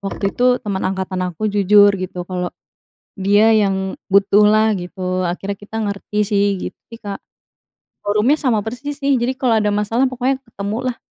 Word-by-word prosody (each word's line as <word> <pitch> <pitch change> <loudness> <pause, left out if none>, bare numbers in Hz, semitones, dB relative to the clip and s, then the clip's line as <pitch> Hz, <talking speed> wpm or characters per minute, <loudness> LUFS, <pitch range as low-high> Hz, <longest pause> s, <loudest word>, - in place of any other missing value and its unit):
waktu 195 0 -3
itu, 250 0 +3
temen 195 -2 -2
angkatan 190 0 -2
aku, 210 +5 -3
jujur, 205 0 +5
gitu, 180 -1 -5
kalau 180 -1 -3 0.7
dia 205 +3 +4
yang 190 -2 +1 0.2
butuhlah, 210 +2 +4
gitu. 185 0 -3
Akhirnya 185 +3 -3
kita 210 +2 -9
ngerti, 210 0 -3
sih. 205 -1 +2
Gitu - - -7
sih, 230 - -10
Kak. 200 -3 -7 0.8
Forumnya 210 +7 +2
sama 250 -8 +1
persis 260 +6 -6
sih, 280 -1 +1
jadi 250 +2 -1
kalau 245 -4 +1
ada 210 -1 +1
masalah, 225 +5 +1
pokoknya 255 +1 -1
ketemu, 210 -2 -5
lah. 235 - -8
205 Hz, 160 wpm, -19 LUFS, 195-225 Hz, 0.8 s, jujur